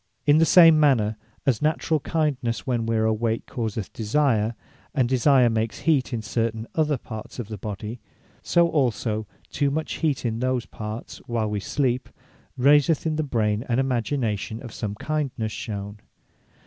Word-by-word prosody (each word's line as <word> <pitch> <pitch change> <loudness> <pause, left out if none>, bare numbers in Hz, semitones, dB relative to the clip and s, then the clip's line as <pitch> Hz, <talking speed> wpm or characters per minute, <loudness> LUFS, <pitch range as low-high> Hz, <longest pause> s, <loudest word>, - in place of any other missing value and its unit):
In 145 +2 +5
the 165 - +4
same 165 -1 +8
manner; 120 -8 +3 0.3
as 125 -6 +2
naturall 155 +1 +1
kindness, 140 -7 -1
when 120 -4 -1
we 115 - +1
are 110 - +2
awake 110 +1 0
causeth 110 -5 -4
desire; 115 -1 +1 0.4
and 130 -4 +3
desire 130 0 +4
makes 115 -1 -1
heat 145 -5 +2
in 115 -3 -3
certain 115 0 -2
other 155 -3 +1
parts 110 -3 -9
of 120 -4 -5
the 110 - -5
body; 105 +3 -6 0.4
so 170 0 +3
also, 115 -8 0 0.2
too 145 -1 +1
much 155 +3 -3
heat 150 -6 0
in 115 -1 -1
those 130 -1 0
parts, 110 +1 -7
while 110 -3 -1
wee 105 - -1
sleep, 125 +3 -1 0.5
raiseth 145 +4 +4
in 155 -1 0
the 155 - 0
brain 110 -6 0
an 120 - +2
imagination 120 -4 -1
of 120 - -9
some 105 -2 -4
kindness 135 -5 -2
shewn. 100 -1 -6
120 Hz, 160 wpm, -24 LUFS, 110-145 Hz, 0.5 s, same